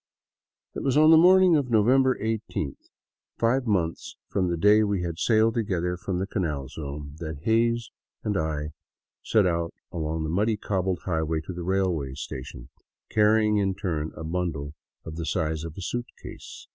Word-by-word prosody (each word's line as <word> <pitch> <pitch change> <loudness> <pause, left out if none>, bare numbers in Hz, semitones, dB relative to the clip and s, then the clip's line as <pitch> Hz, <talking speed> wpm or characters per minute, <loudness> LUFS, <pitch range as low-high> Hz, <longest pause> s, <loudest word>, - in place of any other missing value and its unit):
It - - -5
was 135 0 +1
on 155 +1 +7
the - - +9
morning 180 +1 +6
of 140 -4 0
November 130 +4 +4
eighteenth, 110 - -4 0.5
five 125 +2 +1
months 85 -6 -1
from 95 -2 0
the 85 - -1
day 105 +5 +5
we 100 -4 0
had 85 -1 -4
sailed 110 0 +3
together 90 -6 -1
from 90 +1 -3
the 95 - -1
Canal 75 - -3
Zone, 70 -1 -7
that 80 -3 -6
Hays 115 +1 +1 0.3
and 105 - -1
I 75 -2 -2 0.5
set 110 -3 +2
out 85 -1 -1 0.2
along 80 -1 -2
the 80 - -2
muddy, 105 +5 +1
cobbled 95 -3 -1
highway 80 -3 0
to 85 +4 -7
the 90 - -6
railway 85 -7 -1
station, 65 -2 -8 0.4
carrying 105 0 +4
in 95 -2 +1
turn 80 -7 -3
a 80 - -6
bundle 80 -4 -3 0.3
of 80 0 -7
the 85 - -3
size 80 -3 -1
of 80 -1 -8
a - - -5
suitcase. 120 +6 -7
90 Hz, 170 wpm, -26 LUFS, 80-110 Hz, 0.5 s, the